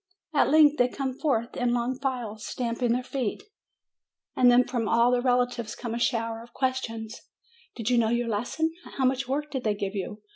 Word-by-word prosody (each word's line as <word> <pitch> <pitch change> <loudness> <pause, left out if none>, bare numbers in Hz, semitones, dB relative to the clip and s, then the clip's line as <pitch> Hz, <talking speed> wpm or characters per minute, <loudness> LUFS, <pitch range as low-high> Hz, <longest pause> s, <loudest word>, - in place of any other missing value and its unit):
At 295 - +3
length 300 0 +6
they 245 - +5
come 265 +1 -3
forth, 250 -5 -1
in 245 -1 +1
long 245 +2 -1
files, 240 -6 -3
stamping 240 0 -1
their 250 +1 -1
feet. 250 -4 -3 0.9
And 250 -1 +5
then 245 +1 +6
from 240 -4 -2
all 235 +1 +4
the 250 -1 +2
relatives 245 -2 0
comes 235 -2 -5
a - - -4
shower 230 -1 0
of 235 +1 -15
questions: 235 -4 -3 0.6
''Did 230 0 -1
you 245 - +4
know 225 -1 +2
your 240 0 0
lesson? 245 +9 -1 0.2
How 265 - +2
much 260 +1 +1
work 295 +3 -2
did 265 -3 -3
they 215 -2 +1
give 200 -1 -3
you? 210 +1 -5
245 Hz, 195 wpm, -27 LUFS, 230-260 Hz, 0.9 s, length